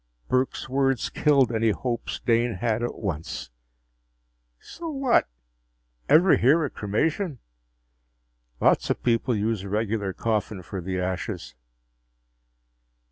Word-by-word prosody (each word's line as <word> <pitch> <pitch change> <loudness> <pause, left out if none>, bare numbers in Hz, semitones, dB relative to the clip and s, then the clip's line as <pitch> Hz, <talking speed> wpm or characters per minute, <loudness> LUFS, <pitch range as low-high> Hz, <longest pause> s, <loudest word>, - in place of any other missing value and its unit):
Burke's 130 +1 0
words 135 -2 0
killed 140 -5 +3
any 115 0 +2
hopes 120 +2 -3
Dane 115 0 +2
had 115 -1 -1
at 120 - -2
once. 75 - -4 1.1
"So 335 -1 -8
what? 270 - +2 0.8
Ever 175 +4 +6
hear 150 +6 +4
of 140 - -6
cremation? 145 - -1 1.2
Lots - - +3
of - - -1
people 120 +1 +1
use 110 0 0
a 100 - -7
regular 105 -1 -1
coffin 105 -2 -2
for 95 +2 -6
the 95 +1 -3
ashes." 90 +1 -4
115 Hz, 115 wpm, -25 LUFS, 100-135 Hz, 1.2 s, Ever